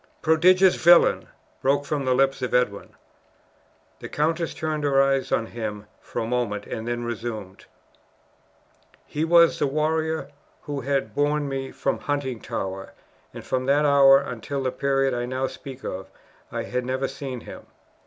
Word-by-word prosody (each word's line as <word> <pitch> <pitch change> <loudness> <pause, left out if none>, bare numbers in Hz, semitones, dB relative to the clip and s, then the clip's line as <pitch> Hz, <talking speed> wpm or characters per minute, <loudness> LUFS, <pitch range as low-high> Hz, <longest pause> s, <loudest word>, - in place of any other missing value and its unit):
"Prodigious 180 +4 +5
villain!" 175 +1 +6 0.3
broke 140 +2 +1
from 145 -2 -2
the 130 -1 +2
lips 135 0 +2
of 125 - -1
Edwin. 125 -5 -1 1.0
The - - -8
countess 160 +2 -1
turned 155 -1 -3
her 140 -2 +3
eye 135 0 +3
on 115 - +1
him 110 -3 -6
for - - -5
a - - -4
moment 115 -4 -2
and 110 0 -6
then 120 0 -2
resumed: 110 -4 -6 1.4
"He 150 - -3
was 170 0 +5
the 145 - +2
warrior 160 +2 -1 0.3
who 145 -2 -4
had 135 -4 -1
borne 145 +2 +1
me 135 -1 -4
from - - -2
Huntingtower, 120 -9 -4 0.4
and - - -10
from 130 0 -2
that 145 +2 +3
hour 140 -1 +7
until 135 +1 -4
the 130 - 0
period 135 0 +1
I 120 0 -2
now 130 +1 -1
speak 135 0 -8
of, 95 +1 -6 0.4
I - - -3
had 125 0 -3
never 130 +2 -1
seen 135 -3 -6
him. - - -11
135 Hz, 155 wpm, -24 LUFS, 120-145 Hz, 1.4 s, hour